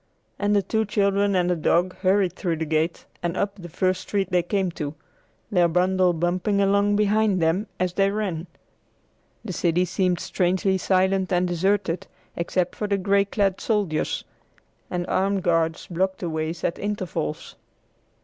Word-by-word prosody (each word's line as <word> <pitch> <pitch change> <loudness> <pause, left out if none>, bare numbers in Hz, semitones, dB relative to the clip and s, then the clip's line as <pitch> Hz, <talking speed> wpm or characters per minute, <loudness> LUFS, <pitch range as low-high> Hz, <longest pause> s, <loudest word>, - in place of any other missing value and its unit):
And 205 0 +2
the 200 - +3
two 220 +3 0
children 200 -1 +1
and 180 -1 +2
the 180 - +2
dog 175 +3 +1
hurried 190 -1 +2
through 175 -3 -2
the 160 0 -3
gate 160 +2 -1 0.2
and 175 +1 -2
up 200 0 0
the 180 -4 -10
first 185 +2 0
street 195 -2 -2
they 180 -1 +3
came 190 +1 -1
to, 150 -2 -5 0.6
their 175 -3 +4
bundle 180 +2 +2
bumping 175 +4 0
along 200 +1 +3
behind 210 -1 +2
them 170 +6 +1
as 180 -1 0
they 195 +1 +3
ran. 195 -5 -3 1.0
The 190 - -4
city 175 +1 +1
seemed 180 0 0
strangely 190 +1 0
silent 190 0 +1
and 180 0 +2
deserted, 185 0 0 0.3
except 175 +1 -1
for 210 - -2
the 200 -1 +1
gray 200 +1 +2
clad 200 -2 0
soldiers, 200 -9 0 0.7
and 175 -1 -2
armed 195 +1 0
guards 165 -1 +1
blocked 190 +2 -1
the 175 -3 -2
way 155 0 -1
at - - -1
intervals. 185 - -3
185 Hz, 160 wpm, -24 LUFS, 175-200 Hz, 1.0 s, their